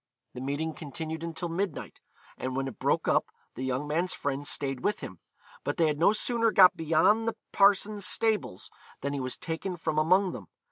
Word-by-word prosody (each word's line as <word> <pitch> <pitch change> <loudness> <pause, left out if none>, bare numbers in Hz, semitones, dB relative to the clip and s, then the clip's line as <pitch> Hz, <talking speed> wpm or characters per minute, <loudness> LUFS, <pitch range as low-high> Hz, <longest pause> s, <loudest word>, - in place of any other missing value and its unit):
The 125 - -7
meeting 145 +4 -2
continued 160 +2 -6
until 170 +1 -4
midnight, 175 0 -4 0.3
and 130 0 -4
when 135 0 -1
it 130 - -8
broke - - +1
up - - +2 0.3
the - - -8
young 130 +2 -1
man's 170 +5 0
friends 140 0 -1
stayed 135 -2 -1
with 205 - -1
him; 95 -3 -8 0.4
but - - -2
they 165 - +4
had 150 -1 0
no 170 - +5
sooner 230 +1 +2
got 185 -3 +7
beyond 165 +8 +3
the 230 - -1 0.2
parson's 200 +1 +3
stables 220 - 0 0.3
than 140 +1 -2
he 140 - -2
was 130 -1 -3
taken 175 +2 -4
from 160 -2 -1
among 185 +4 +3
them. - - -8
160 Hz, 190 wpm, -28 LUFS, 140-195 Hz, 0.4 s, got